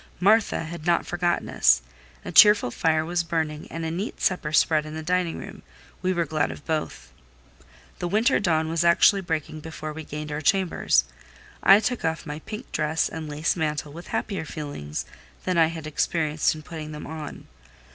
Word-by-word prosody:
Martha 210 0 +3
had 165 0 -7
not 170 -1 +3
forgotten 175 0 -1
us; - - +4 0.4
a - - -5
cheerful 210 - +7
fire 160 +2 +1
was 175 +1 0
burning, 160 -2 -2
and 165 0 -5
a 160 - -2
neat 190 +6 -4
supper 180 -5 0
spread 155 +1 +3
in 155 0 -8
the 160 - -5
dining 180 0 0
room: - - -9 0.4
we 185 - +1
were 175 -2 0
glad 155 0 0
of - - -9
both. 155 -2 -3 0.9
The 175 - -2
winter 220 +8 +3
dawn 160 -4 +1
was 165 +1 0
actually 170 +3 +5
breaking 155 -3 -3
before 155 0 -7
we 160 +1 -7
gained 150 0 -6
our 150 +1 -3
chambers. 170 - +2 0.6
I 195 +1 +7
took 245 +3 -2
off 160 0 -1
my 150 0 -5
pink 215 +8 -8
dress 155 +1 0
and 160 -2 -6
lace 150 +2 0
mantle 150 -3 -2
with 170 +3 -10
happier 215 -5 -2
feelings 145 - -6 0.4
than 180 -2 +1
I 165 - +6
had 160 -1 -6
experienced 155 0 0
in 155 - -10
putting 155 -2 -7
them 150 - -7
on. 155 -1 -7
160 Hz, 185 wpm, -25 LUFS, 155-175 Hz, 0.9 s, cheerful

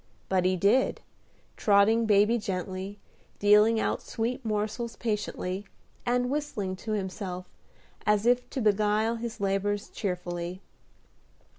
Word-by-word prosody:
But 185 -1 +2
he 185 0 +3
did, 205 +9 +2 0.6
trotting 220 +2 +4
baby 210 +3 +4
gently, 190 0 -4 0.4
dealing 210 +2 +5
out - - 0
sweet 245 +4 -3
morsels 220 +2 -2
patiently, 205 -3 -3 0.4
and 245 +1 +1
whistling 250 -11 -2
to 215 +3 -4
himself, 190 -2 -4 0.6
as 210 0 +2
if 245 +1 +3
to 265 - -3
beguile 215 +2 +2
his 230 0 -5
labors 200 +1 0
cheerfully. 180 -2 -4
210 Hz, 115 wpm, -28 LUFS, 195-230 Hz, 0.6 s, dealing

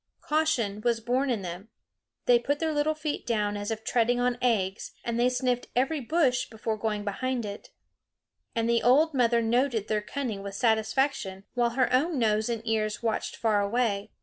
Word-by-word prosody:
Caution 300 -11 0
was 235 -1 +2
born 255 +4 0
in 225 -6 -1
them; 180 +4 -7 0.6
they 245 -1 +5
put 285 +5 -1
their 320 0 -1
little 300 +1 +1
feet 305 -1 -3
down 210 -3 0
as 205 0 -4
if 220 -1 -4
treading 245 0 +2
on 245 0 0
eggs, 200 -6 0
and 235 0 -1
they 245 +1 +4
sniffed 250 -1 -1
every 270 +5 +1
bush 275 -1 +1
before 220 0 -3
going 210 -1 -2
behind 240 +4 -2
it. 200 0 -7 0.9
And 230 0 +1
the 235 0 +2
old 295 +6 +4
mother 235 -3 +3
noted 235 -1 +1
their 215 -1 +1
cunning 225 -3 -4
with 200 0 -6
satisfaction 220 -3 0
while 240 -1 +2
her 255 - +4
own 300 +5 +2
nose 215 -1 +1
and 230 -1 -3
ears 215 0 -1
watched 225 -2 -1
far 215 -3 +1
away. 205 -1 0
235 Hz, 180 wpm, -28 LUFS, 215-255 Hz, 0.9 s, they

